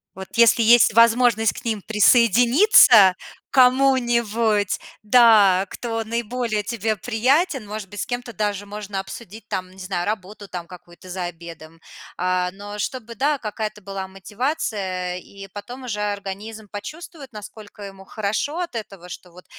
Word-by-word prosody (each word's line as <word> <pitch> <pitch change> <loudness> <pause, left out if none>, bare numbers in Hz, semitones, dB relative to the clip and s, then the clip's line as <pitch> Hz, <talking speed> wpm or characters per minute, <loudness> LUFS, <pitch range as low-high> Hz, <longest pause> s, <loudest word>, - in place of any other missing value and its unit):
Вот 190 0 -9
если 235 0 +5
есть 230 -1 +5
возможность 230 -1 +4
к - - -11
ним 220 -4 -2
присоединиться, 230 - +5 0.3
к - - -20
кому-нибудь, 240 -5 +2 0.2
да. 210 -5 +5
Кто 225 -2 -4
наиболее 230 -1 -3
тебе 220 -1 -2
приятен. 255 - 0
Может 210 -2 -6
быть, 205 0 -8
с - - -3
кем-то 245 -1 -5
даже 205 -2 -3
можно 205 -1 -6
обсудить 210 +2 -9
там, 185 0 -4
не 190 - -19
знаю, 185 -1 -4
работу, 205 -1 -5
там, 175 -2 -7
какую-то 175 0 -15
за 180 0 -4
обедом. 165 -1 -10 0.4
А. 180 0 0
Но 205 +1 -8
чтобы, 235 0 -5
да, 285 +3 0
какая-то 215 -1 -5
была 195 -1 -6
мотивация. 195 - -3
И 195 +2 -12
потом 245 +5 -9
уже 210 -4 -4
организм 205 +2 -5
почувствует, 285 - -9
насколько 210 0 -11
ему 195 -1 -11
хорошо 215 - -3
от 345 -8 -4
этого. 195 -5 -8
Что 180 0 -10
вот 180 +1 -16
210 Hz, 145 wpm, -22 LUFS, 195-235 Hz, 0.4 s, если